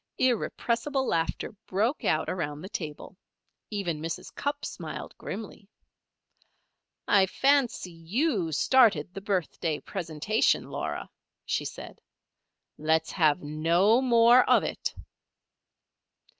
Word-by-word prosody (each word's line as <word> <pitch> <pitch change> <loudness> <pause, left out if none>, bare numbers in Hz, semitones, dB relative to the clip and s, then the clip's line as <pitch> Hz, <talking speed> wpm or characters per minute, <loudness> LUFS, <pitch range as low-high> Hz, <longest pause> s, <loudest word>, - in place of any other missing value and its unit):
Irrepressible 255 +2 0
laughter 165 +2 -1 0.2
broke 220 +9 0
out 155 0 +1
around 150 -5 -3
the 190 - -8
table. 160 -2 -6 0.5
Even 175 -7 -3
Mrs. 165 0 -5
Cupp 285 0 -3
smiled - - -7
grimly. 210 -2 -7 1.4
"I 195 -2 +5
fancy 270 -6 +1
you 180 - -1
started 220 - +3
the 195 - -6
birthday 175 -5 -1
presentation, 185 +4 0
Laura," - - -4 0.4
she - - -1
said. - - -8 0.8
"Let 160 +1 +2
us - - -9
have 155 -1 +2
no 170 - +3
more 240 0 +6
of - - +5
it." - - -3
195 Hz, 105 wpm, -28 LUFS, 165-235 Hz, 1.4 s, more